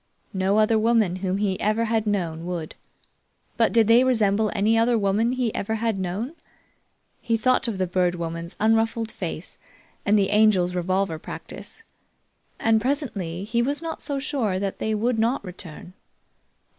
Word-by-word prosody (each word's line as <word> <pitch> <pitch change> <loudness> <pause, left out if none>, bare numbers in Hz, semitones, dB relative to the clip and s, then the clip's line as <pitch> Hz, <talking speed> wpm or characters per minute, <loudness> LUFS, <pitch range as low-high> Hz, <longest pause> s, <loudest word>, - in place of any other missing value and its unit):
No 190 +2 +1
other 215 +1 +4
woman 220 -5 +2
whom 185 0 -1
he 200 -2 -1
ever 215 +2 +1
had 225 -1 0
known 170 -6 -1
would. 170 -3 -4 0.8
But 230 - +3
did 225 -2 +4
they 235 +2 +6
resemble 220 -4 +2
any 215 +3 +3
other 230 +1 +3
women 215 +4 +1
he 250 -4 -1
ever 220 +3 -2
had 225 -2 -1
known? 195 - -3 0.9
He 230 -1 0
thought 250 +1 +2
of 220 -4 -2
the 185 - +1
Bird 180 0 +1
Woman's 170 0 -5
unruffled 225 +1 +1
face - - -6 0.4
and 205 +1 +3
the 195 -1 +2
Angel's 205 -4 +4
revolver 180 -1 -1
practice, 450 - -9 0.8
and 225 -1 +3
presently 210 - -2
he 230 +3 0
was 280 +4 -1
not 325 -1 -5
so 285 -2 -2
sure 270 -9 -1
that 195 0 -3
they 220 0 0
would 225 +2 0
not 230 0 +1
return. 180 -1 -9
215 Hz, 160 wpm, -24 LUFS, 185-230 Hz, 0.9 s, they